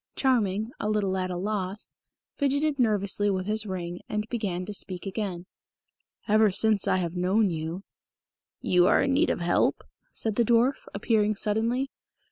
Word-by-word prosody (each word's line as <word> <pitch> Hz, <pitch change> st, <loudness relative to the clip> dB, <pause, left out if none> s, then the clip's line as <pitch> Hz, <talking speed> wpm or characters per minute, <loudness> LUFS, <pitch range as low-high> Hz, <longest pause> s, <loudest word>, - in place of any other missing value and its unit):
Charming, 220 Hz, -4 st, +1 dB
a 210 Hz, -, -1 dB
little 205 Hz, -3 st, 0 dB
at 185 Hz, -1 st, -1 dB
a 180 Hz, -, -3 dB
loss, 195 Hz, +1 st, -3 dB, 0.4 s
fidgeted 285 Hz, +1 st, 0 dB
nervously 205 Hz, -3 st, +2 dB
with 185 Hz, -2 st, -1 dB
his 215 Hz, +1 st, -1 dB
ring, 175 Hz, -2 st, -4 dB
and 210 Hz, 0 st, -2 dB
began 195 Hz, -7 st, -2 dB
to 210 Hz, -, -6 dB
speak 185 Hz, -2 st, -4 dB
again. 190 Hz, -3 st, -4 dB, 0.8 s
"Ever 215 Hz, 0 st, +5 dB
since 215 Hz, +1 st, +2 dB
I -, -, +3 dB
have 170 Hz, -2 st, -2 dB
known 190 Hz, +3 st, +2 dB
you 165 Hz, +3 st, -4 dB, 0.4 s
" -, -, -66 dB
"You 180 Hz, 0 st, +6 dB
are -, -, +4 dB
in 275 Hz, -, +1 dB
need 300 Hz, +5 st, +3 dB
of -, -, -1 dB
help?" 175 Hz, 0 st, +1 dB, 0.3 s
said 220 Hz, -2 st, -2 dB
the 240 Hz, -, +4 dB
dwarf, 240 Hz, +4 st, +2 dB
appearing 215 Hz, 0 st, +1 dB
suddenly. 230 Hz, +6 st, 0 dB
210 Hz, 165 wpm, -27 LUFS, 185-225 Hz, 0.8 s, You